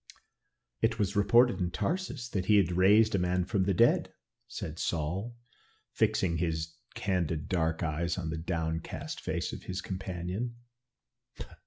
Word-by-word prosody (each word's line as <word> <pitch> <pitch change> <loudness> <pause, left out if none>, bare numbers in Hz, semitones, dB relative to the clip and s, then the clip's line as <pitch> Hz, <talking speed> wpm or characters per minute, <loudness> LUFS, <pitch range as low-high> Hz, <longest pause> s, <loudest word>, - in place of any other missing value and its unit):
"It 115 +1 +2
was 100 -2 0
reported 115 +1 +5
in 90 -2 0
Tarsus 150 - -2
that 95 -5 -2
he 105 - +5
had 95 -4 +3
raised 105 +5 +5
a 100 - +2
man 90 0 +1
from 95 -1 0
the 100 - +2
dead," 115 +6 +4 0.4
said 80 +1 -6
Saul, 90 +9 -2 0.6
fixing 85 -3 +1
his 80 -1 -2 0.2
candid 85 -5 -1
dark 80 -2 0
eyes 85 +2 -1
on 80 -4 -3
the 80 - -3
downcast 80 -1 -3
face - - -2
of - - -8
his 95 0 -4
companion. 95 +5 -4
90 Hz, 145 wpm, -30 LUFS, 85-105 Hz, 0.6 s, reported